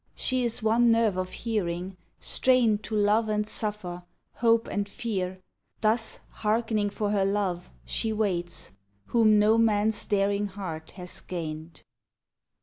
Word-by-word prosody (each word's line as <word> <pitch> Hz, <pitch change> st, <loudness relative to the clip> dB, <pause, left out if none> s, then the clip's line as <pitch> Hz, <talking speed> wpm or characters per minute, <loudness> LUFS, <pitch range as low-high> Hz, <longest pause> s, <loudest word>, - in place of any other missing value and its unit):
She 255 Hz, -1 st, 0 dB
is 230 Hz, -2 st, +2 dB
one 230 Hz, +2 st, +4 dB
nerve 225 Hz, -4 st, +3 dB
of 185 Hz, 0 st, -2 dB
hearing, 185 Hz, -5 st, -3 dB, 0.2 s
strained 240 Hz, -5 st, +3 dB
To 220 Hz, -, -4 dB
love 210 Hz, +2 st, +2 dB
and 210 Hz, 0 st, 0 dB
suffer, 205 Hz, -5 st, -2 dB, 0.4 s
hope 230 Hz, -1 st, +3 dB
and 205 Hz, -1 st, -2 dB
fear 190 Hz, -6 st, -3 dB, 0.4 s
Thus, 225 Hz, +1 st, +1 dB
hearkening 215 Hz, -1 st, 0 dB
for 205 Hz, 0 st, -2 dB
her 200 Hz, -2 st, +2 dB
Love, 195 Hz, -3 st, -1 dB, 0.2 s
she 220 Hz, -, -1 dB
waits, 180 Hz, -, -2 dB, 0.4 s
Whom 220 Hz, -3 st, +5 dB
no 215 Hz, +2 st, +4 dB
man's 215 Hz, -1 st, +2 dB
daring 200 Hz, 0 st, +1 dB
heart 180 Hz, -5 st, -7 dB
has 180 Hz, -1 st, -3 dB
gained. 160 Hz, -2 st, -6 dB
210 Hz, 135 wpm, -27 LUFS, 185-225 Hz, 0.4 s, Whom